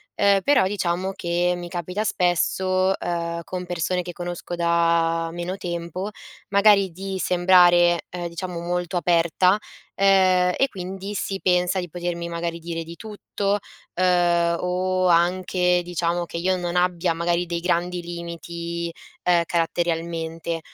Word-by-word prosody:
Ehm, 200 Hz, -1 st, +4 dB
però 280 Hz, -1 st, +4 dB
diciamo 190 Hz, -1 st, -1 dB
che 175 Hz, -1 st, 0 dB
mi 175 Hz, 0 st, -6 dB
capita 180 Hz, +4 st, -3 dB
spesso, 185 Hz, -1 st, +1 dB
uhm, 170 Hz, -1 st, -3 dB
con 180 Hz, +1 st, -5 dB
persone 180 Hz, +1 st, -1 dB
che 175 Hz, -, -6 dB
conosco 175 Hz, 0 st, -5 dB
da 170 Hz, -1 st, +2 dB
meno 175 Hz, +2 st, -4 dB
tempo, 175 Hz, +1 st, -4 dB, 0.4 s
magari 200 Hz, -1 st, +5 dB
di 190 Hz, +3 st, -5 dB
sembrare, 175 Hz, -1 st, +5 dB
uhm, 175 Hz, -1 st, -4 dB
diciamo 175 Hz, +1 st, -5 dB
molto 175 Hz, +1 st, -2 dB
aperta, 175 Hz, +2 st, +3 dB, 0.4 s
ehm, 185 Hz, -2 st, +4 dB
e 270 Hz, -, +3 dB
quindi 195 Hz, 0 st, -6 dB
si 195 Hz, -1 st, -3 dB
pensa 180 Hz, +1 st, +2 dB
di 180 Hz, -1 st, -5 dB
potermi 175 Hz, 0 st, -4 dB
magari 170 Hz, 0 st, -3 dB
dire 165 Hz, 0 st, -5 dB
di 165 Hz, +1 st, -10 dB
tutto, 205 Hz, -1 st, -2 dB, 0.4 s
uhm, 175 Hz, -2 st, +2 dB
o 185 Hz, +1 st, 0 dB
anche 180 Hz, +1 st, +2 dB
diciamo 175 Hz, 0 st, -1 dB
che 170 Hz, -, -7 dB
io 185 Hz, +2 st, +1 dB
non 175 Hz, -1 st, -3 dB
abbia 180 Hz, -1 st, +1 dB
magari 170 Hz, +1 st, 0 dB
dei 170 Hz, 0 st, -2 dB
grandi 175 Hz, 0 st, 0 dB
limiti, 170 Hz, 0 st, -5 dB, 0.3 s
ehm, 175 Hz, -1 st, +4 dB
caratterialmente, 165 Hz, -1 st, -2 dB
175 Hz, 135 wpm, -23 LUFS, 170-185 Hz, 0.4 s, magari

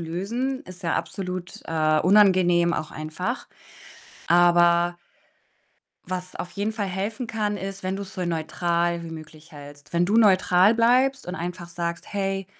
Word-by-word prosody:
lösen. 225 Hz, +11 st, -3 dB
Ist 185 Hz, +1 st, -12 dB
ja 165 Hz, -, 0 dB
absolut, 180 Hz, -2 st, -5 dB
äh, 155 Hz, -1 st, +2 dB
unangenehm 180 Hz, -3 st, +4 dB
auch 155 Hz, -, -4 dB
einfach. 170 Hz, -, -4 dB, 0.8 s
Aber 175 Hz, 0 st, +4 dB, 1.1 s
was 185 Hz, 0 st, -5 dB
auf 180 Hz, -, -6 dB
jeden 205 Hz, +2 st, -2 dB
Fall 215 Hz, -2 st, -3 dB
helfen 205 Hz, +6 st, -3 dB
kann, 210 Hz, -2 st, -2 dB
ist, 195 Hz, 0 st, -6 dB
wenn 190 Hz, +1 st, -2 dB
du's 200 Hz, -1 st, -7 dB
so 185 Hz, -3 st, -3 dB
neutral 170 Hz, +1 st, -1 dB
wie 165 Hz, -, -8 dB
möglich 160 Hz, 0 st, -11 dB
hältst. 145 Hz, 0 st, -13 dB
Wenn 170 Hz, +1 st, +3 dB
du 205 Hz, +5 st, +1 dB
neutral 190 Hz, -1 st, +5 dB
bleibst 255 Hz, +3 st, +3 dB
und 180 Hz, -, -4 dB
einfach 175 Hz, 0 st, -6 dB
sagst: 170 Hz, +1 st, -5 dB
„Hey, 195 Hz, -1 st, -2 dB
180 Hz, 150 wpm, -24 LUFS, 170-200 Hz, 1.1 s, neutral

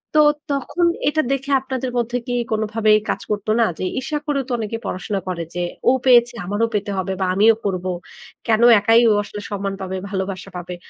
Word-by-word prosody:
তো -, -, +6 dB, 0.3 s
তখন 285 Hz, +5 st, 0 dB, 0.2 s
এটা 310 Hz, +1 st, +1 dB
দেখে 275 Hz, +1 st, -2 dB
আপনাদের 260 Hz, -1 st, -4 dB
মধ্যে 240 Hz, +1 st, 0 dB
কি 245 Hz, -, -2 dB, 0.2 s
কোনোভাবেই 215 Hz, 0 st, +2 dB
কাজ -, -, -1 dB
করতো 210 Hz, +1 st, -1 dB
না? 230 Hz, -, +5 dB
যে, -, -, -3 dB, 0.2 s
ঈর্ষা 285 Hz, +4 st, -3 dB
করেও 280 Hz, -2 st, 0 dB
তো -, -, -7 dB
অনেকে 225 Hz, 0 st, -3 dB
পড়াশোনা 195 Hz, +2 st, -3 dB
করে 175 Hz, -2 st, -3 dB
যে, 175 Hz, -, -1 dB, 0.3 s
"ও -, -, +6 dB
পেয়েছে 240 Hz, -2 st, +5 dB
আমারও 205 Hz, +5 st, 0 dB
পেতে 205 Hz, -1 st, -1 dB
হবে 190 Hz, 0 st, -2 dB
বা -, -, +2 dB
আমিও 215 Hz, +4 st, +5 dB
পড়বো, 185 Hz, -2 st, -2 dB, 0.6 s
কেনো 225 Hz, +1 st, +4 dB
একাই 225 Hz, +3 st, +5 dB
ও -, -, +5 dB
আসলে 205 Hz, 0 st, -8 dB
সম্মান 200 Hz, -1 st, -2 dB
পাবে, 190 Hz, 0 st, -4 dB
ভালোবাসা 190 Hz, -1 st, -4 dB
পাবে?" 180 Hz, 0 st, -6 dB
215 Hz, 195 wpm, -20 LUFS, 195-245 Hz, 0.6 s, তো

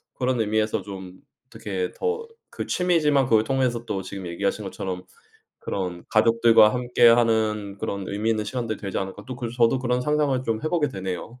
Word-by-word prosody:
그런 125 Hz, -2 st, 0 dB
의미에서 110 Hz, 0 st, 0 dB
좀 95 Hz, -2 st, -9 dB, 0.3 s
어떻게 95 Hz, -3 st, -4 dB
더 455 Hz, 0 st, -2 dB, 0.3 s
그 -, -, -5 dB
취미지만 155 Hz, -6 st, +2 dB
그걸 110 Hz, -3 st, +4 dB
통해서 125 Hz, -2 st, 0 dB
또 95 Hz, -3 st, -3 dB
지금 95 Hz, 0 st, -7 dB
얘기하신 100 Hz, +4 st, -2 dB
것처럼 95 Hz, -1 st, -5 dB, 0.6 s
그런 90 Hz, -3 st, -4 dB
'가족들과 115 Hz, -1 st, +5 dB
함께하는 115 Hz, -4 st, +3 dB
그런 100 Hz, -1 st, -3 dB
의미있는 110 Hz, +1 st, -1 dB
시간들이 110 Hz, 0 st, -3 dB
되지 100 Hz, -3 st, -4 dB
않을까.' 95 Hz, +1 st, -5 dB
또 130 Hz, -, -5 dB
그래서 120 Hz, -1 st, -5 dB
저도 120 Hz, +2 st, +3 dB
그런 125 Hz, -1 st, 0 dB
상상을 145 Hz, -1 st, +1 dB
좀 115 Hz, 0 st, -1 dB
해 155 Hz, -, 0 dB
보게 165 Hz, -3 st, +1 dB
되네요. 95 Hz, +3 st, -6 dB
115 Hz, 390 characters per minute, -24 LUFS, 100-125 Hz, 0.6 s, 가족들과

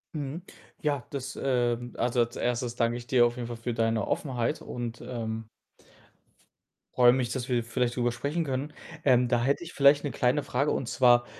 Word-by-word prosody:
Mhm. 145 Hz, +3 st, -4 dB, 0.4 s
Ja, 145 Hz, -4 st, -1 dB
das, 135 Hz, -2 st, -5 dB
ähm 120 Hz, -2 st, 0 dB
also, 120 Hz, +1 st, 0 dB
als 120 Hz, 0 st, +1 dB
1. 120 Hz, 0 st, -1 dB
danke 120 Hz, 0 st, +1 dB
ich 120 Hz, -1 st, -10 dB
dir 120 Hz, -1 st, +5 dB
auf 120 Hz, 0 st, 0 dB
jeden 120 Hz, -, -4 dB
Fall 120 Hz, -, -5 dB
für 115 Hz, +1 st, -3 dB
deine 115 Hz, -1 st, 0 dB
Offenheit 130 Hz, +1 st, -1 dB
und, 120 Hz, -1 st, -6 dB
ähm 115 Hz, -2 st, -4 dB, 1.5 s
freue 125 Hz, -1 st, +6 dB
mich, 125 Hz, -2 st, -1 dB
dass 125 Hz, -2 st, -3 dB
wir 120 Hz, -2 st, +1 dB
vielleicht 120 Hz, +1 st, -1 dB
drüber 120 Hz, -1 st, +1 dB
sprechen 140 Hz, +8 st, -2 dB
können. 140 Hz, +1 st, -3 dB, 0.3 s
Ähm, 125 Hz, -2 st, +4 dB
da 120 Hz, -2 st, +2 dB
hätte 140 Hz, +7 st, +1 dB
ich 170 Hz, -, -8 dB
vielleicht 140 Hz, +1 st, +5 dB
'ne 145 Hz, -, -2 dB
kleine 130 Hz, +4 st, +1 dB
Frage, 140 Hz, +4 st, 0 dB
und 120 Hz, -, -2 dB
zwar, 120 Hz, -1 st, +5 dB
125 Hz, 190 wpm, -28 LUFS, 120-135 Hz, 1.5 s, freue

